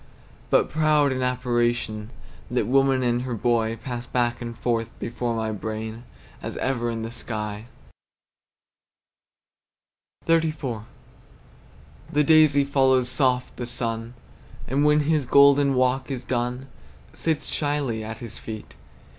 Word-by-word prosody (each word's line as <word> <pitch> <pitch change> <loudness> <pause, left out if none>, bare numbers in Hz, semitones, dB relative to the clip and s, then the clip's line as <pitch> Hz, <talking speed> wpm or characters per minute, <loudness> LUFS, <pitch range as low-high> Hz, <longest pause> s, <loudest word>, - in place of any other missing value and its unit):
But - - +4
proud 150 -2 +3
in 130 0 -2
apparition, 120 -3 0 0.4
That 120 -3 0
woman 135 +1 +3
and 120 0 +1
her 125 -1 -3
boy 115 0 +1
Pass 120 -1 -5
back 120 -1 0
and 115 -1 -6
forth 115 -2 -1
before 120 0 -2
my 110 -1 -1
brain, 110 +3 -5 0.4
As - - -5
ever 120 -3 -1
in 115 -1 -3
the 115 - -5
sky. 105 -2 -5 2.6
XXXIV. 155 -9 0 1.3
The 150 +1 +3
daisy 155 -2 +5
follows 130 -2 +3
soft 125 -1 +1
the 120 - -4
sun, 115 0 -3 0.5
And 140 +3 +1
when 150 0 +4
his 150 -3 +1
golden 140 -1 +6
walk 130 +1 +1
is 130 -2 -4
done, 125 +1 -2 0.5
Sits 160 -2 -1
shyly 145 -7 -1
at 110 +1 -6
his 115 -1 -8
feet. 110 -1 -8
125 Hz, 125 wpm, -24 LUFS, 115-140 Hz, 2.6 s, golden